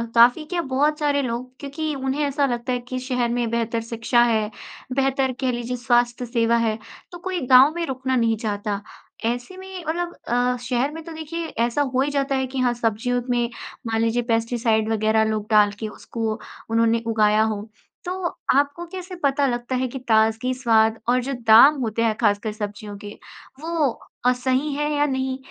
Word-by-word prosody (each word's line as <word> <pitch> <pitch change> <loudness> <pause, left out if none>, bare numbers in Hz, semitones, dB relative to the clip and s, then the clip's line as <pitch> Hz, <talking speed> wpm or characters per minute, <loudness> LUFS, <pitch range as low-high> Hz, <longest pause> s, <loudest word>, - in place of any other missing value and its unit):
काफ़ी 245 +6 +6
क्या 345 +2 -2
बहुत 295 +2 0
सारे 285 -1 +1
लोग 250 0 -3
क्योंकि 300 +2 -4
उन्हें 270 +2 -1
ऐसा 280 0 +1
लगता 245 0 -2
है 245 - 0
कि 255 0 -2
शहर 250 -2 -1
में 235 -1 0
बेहतर 230 0 -1
शिक्षा 230 +1 +1
है, 220 -3 +1 0.4
बेहतर 270 -1 +1
कह 260 -2 +1
लीजिए 240 +1 -3
स्वास्थ्य 240 +1 +1
सेवा 235 -1 +1
है, 225 -2 0 0.3
तो 350 - -8
कोई 370 0 -3
गाँव 260 +4 +8
में 340 -1 -1
रुकना 260 -2 -2
नहीं 230 -2 +2
चाहता। 205 -2 -3 0.4
ऐसे 245 +10 -2
में 375 -2 -8
मतलब 345 +2 -2
अ, 245 +1 +1
शहर 250 +3 0
में 320 +1 -8
तो 335 - -9
देखिए 320 +1 -5 0.2
ऐसा 240 +5 0
हो 260 -1 +1
ही 290 +1 0
जाता 275 -1 0
है 265 0 0
कि 260 0 -5
हाँ, 245 -1 +2
सब्जियों 240 +1 -1
में 240 -1 +1 0.4
मान 225 0 0
लीजिए 230 +1 +1
पेस्टिसाइड 225 -1 +1
वग़ैरह 220 0 +2
लोग 215 -1 -2
डाल 210 -1 +5
के 220 - -3
उसको 220 +1 -4 0.4
उन्होंने 230 0 +2
उगाया 215 -1 +3
हो। 215 -2 -1 0.4
तो 360 - -3 0.5
आपको 290 +4 -2
कैसे 370 -1 -7
पता 280 0 +2
लगता 240 0 -2
है 255 0 0
कि 265 +2 -6
ताज़गी, 225 +2 +3
स्वाद 225 -3 +2
और 250 - +4
जो 275 +1 -3
दाम 235 +7 +9
होते 230 0 -1
हैं 220 -2 +2
ख़ासकर 210 0 +1
सब्जियों 205 -1 -6
के 205 +1 -9 0.5
वो 325 -2 0 0.4
अ, 250 - +6
सही 260 +4 0
है 295 +1 -1
या 290 0 +2
नहीं? 265 -1 -1
245 Hz, 190 wpm, -23 LUFS, 225-275 Hz, 0.5 s, दाम